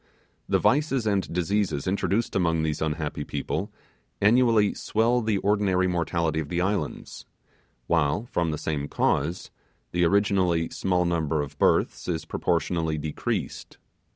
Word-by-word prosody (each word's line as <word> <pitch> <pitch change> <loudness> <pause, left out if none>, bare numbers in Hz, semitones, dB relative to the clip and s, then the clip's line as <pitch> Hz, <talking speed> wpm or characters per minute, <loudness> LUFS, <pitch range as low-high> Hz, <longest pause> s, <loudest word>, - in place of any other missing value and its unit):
The - - +4
vices 135 -4 +2
and 100 -3 0
diseases 90 -3 0
introduced 100 +4 0
among 85 -4 +1
these 80 -1 -2
unhappy 75 -1 -2
people 70 -1 -3 0.5
annually 115 -1 +4
swell 115 +3 +1
the 110 -2 0
ordinary 100 -2 +1
mortality 85 -2 0
of 75 -2 -4
the 85 - -1
islands, 95 +2 -3 0.6
while, 85 +5 +1
from 85 -8 -1
the 75 - -2
same 75 -2 -3
cause, 80 +6 -1 0.4
the 90 0 +1
originally 90 -3 +2
small 90 -1 0
number 80 -3 0
of 75 0 -9
births - - +2
is 80 -3 -2
proportionally 80 -1 -1
decreased. 75 0 -4
85 Hz, 130 wpm, -26 LUFS, 80-100 Hz, 0.6 s, The